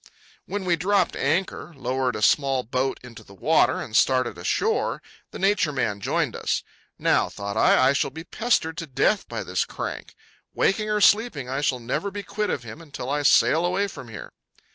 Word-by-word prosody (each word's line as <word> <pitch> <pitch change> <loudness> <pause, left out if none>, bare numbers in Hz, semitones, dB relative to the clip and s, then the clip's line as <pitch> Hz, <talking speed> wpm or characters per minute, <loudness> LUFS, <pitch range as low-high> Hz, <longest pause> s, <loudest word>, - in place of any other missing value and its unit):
When 200 -1 -4
we 175 -2 +3
dropped 195 +5 +1
anchor, 170 +2 -1
lowered 130 -1 -1
a 105 - -3
small 135 0 +3
boat 130 +3 -2
into 120 -2 -12
the 100 - -16
water, - - +2
and 110 - -6
started 130 -4 +3
ashore, 85 - 0 0.3
the - - -9
Nature 195 -5 +2
Man 105 -7 -2
joined - - -1
us. - - -1 0.3
Now, - - +2
thought 100 0 -6
I, 130 +3 +4
I - - +3
shall 140 - 0
be 160 - -9
pestered 170 -5 0
to 165 -2 -5
death 130 - +1
by - - -4
this - - -1
crank. - - -6 0.4
Waking 215 +2 +1
or 210 0 +1
sleeping 205 - +3
I 135 +2 -2
shall 130 -3 0
never 125 +12 -2
be 200 0 -6
quit 210 +1 -3
of 125 - -2
him 120 +8 -9
until 140 -4 -6
I 145 0 0
sail 155 +3 +4
away 185 +3 +1
from 140 -10 -10
here. 110 -3 -9
140 Hz, 190 wpm, -24 LUFS, 125-190 Hz, 0.4 s, I